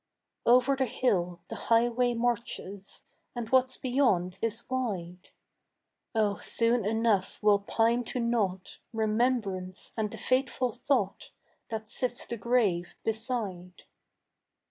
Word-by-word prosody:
Over 250 +3 +5
the 265 -1 0
hill 185 -8 0
the 225 - -6
highway 240 +1 +3
marches 230 -4 -3 0.3
And 235 -2 -4
what's 260 0 +3
beyond 245 -9 +1
is 230 0 -2
wide: 190 -9 -3 0.9
Oh 210 -2 +2
soon 230 0 +1
enough 220 -3 +1
will 205 -1 +5
pine 230 +4 +1
to 250 - -3
nought 210 -6 -1
Remembrance 215 -4 -1
and 215 -2 -1
the - - -8
faithful 255 -1 +1
thought 215 -5 -1 0.4
That 220 -1 -4
sits 245 +2 -2
the 235 - -5
grave 205 -6 +1
beside. 220 -6 -3
225 Hz, 115 wpm, -29 LUFS, 200-245 Hz, 0.9 s, Over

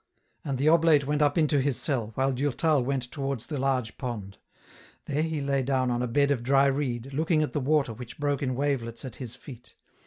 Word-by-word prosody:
And 140 -2 -2
the 140 +4 +1
oblate 160 -3 +5
went 150 +1 0
up 145 -1 +3
to 150 -3 +3
his 135 -2 0
cell, 125 -8 -1
while 135 +1 +1
Durtal 145 +2 +1
went 130 -1 -2
towards 135 -4 -3
the 150 -3 -4
large 130 -5 -1
pond. 105 -7 -5 0.7
There 145 +1 -1
he 160 -2 -1
lay 140 -1 0
down 130 -1 0
on 120 0 0
a 125 - 0
bed 140 +4 +2
of 130 -4 0
dry 135 +3 +4
reed, 135 -2 -1
looking 155 +2 +2
at 150 - -4
the 150 - 0
water 140 -3 +1
which 120 +2 -10
broke 145 -2 0
in 130 -2 -1
wavelets 130 -4 -2
at 125 -3 -8
his 125 -3 -6
feet. 125 -3 -13
135 Hz, 215 wpm, -27 LUFS, 125-145 Hz, 0.7 s, oblate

